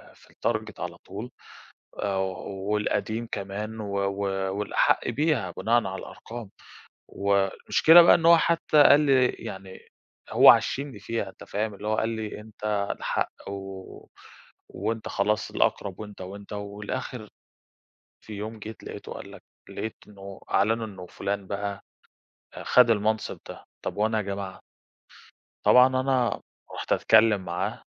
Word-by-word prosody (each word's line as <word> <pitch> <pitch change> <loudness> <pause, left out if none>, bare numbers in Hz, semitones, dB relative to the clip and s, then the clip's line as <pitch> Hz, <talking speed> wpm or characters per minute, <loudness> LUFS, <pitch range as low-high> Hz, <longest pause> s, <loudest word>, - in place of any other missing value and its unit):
في - - -21
الtarget 110 -1 -3
على 90 -1 -5
طول، 110 +6 -7 0.7
آآ 100 -1 0
والقديم 105 +4 -2
كمان، 105 +3 -5
و 100 -1 -3
و 95 -1 -1
والأحق 105 - +1
بيها 145 - 0
بناءً 110 +5 +1
على 95 0 -5
الأرقام. 115 -3 -9 0.6
والمشكلة 100 - +5
بقى - - +7
إن 165 - +1
هو 170 0 +9
حتى 160 -2 +4
قال 145 0 +7
لي 135 -4 +4
يعني، 95 0 -8 0.5
هو - - +9
عشّمني 135 -5 +1
فيها، 105 0 -3
أنت - - -14
فاهم؟ 105 0 -3
اللي 105 +2 -6
هو 110 - +1
قال 110 - 0
لي: 110 -2 -5
"أنت 110 0 -14 0.3
الأحق، - - -2 0.2
و 100 - -4 1.1
و 100 +3 -5
وأنت 115 -1 -3
خلاص 105 +1 0
الأقرب، 100 -1 -1
وأنت 105 -2 -9
وأنت." 100 +3 -9
والآخر 105 +2 -5 0.9
في 110 - -12
يوم 110 +2 -6
جيت 110 0 -9
لاقيته - - -8
قال - - -9
لك، - - -13 0.3
لقيت 110 - -5
إنه 100 -1 -11
أعلنوا 110 +2 +2
إنه 95 -4 -10
فُلان 100 +1 -4
بقى 100 0 -4 0.7
آآ، - - -8
خد 125 -2 +5
المنصب 110 0 0
ده. - - -10 0.2
طَب - - -4
وأنا 110 +1 +1
يا - - 0
جماعة؟ 100 -1 -5 1.1
طبعًا 125 +1 +8
أنا 130 -1 0 0.3
رُحت - - -6
أتكلم 110 -2 +4
معاه 95 +6 -3
105 Hz, 140 wpm, -26 LUFS, 100-115 Hz, 1.1 s, هو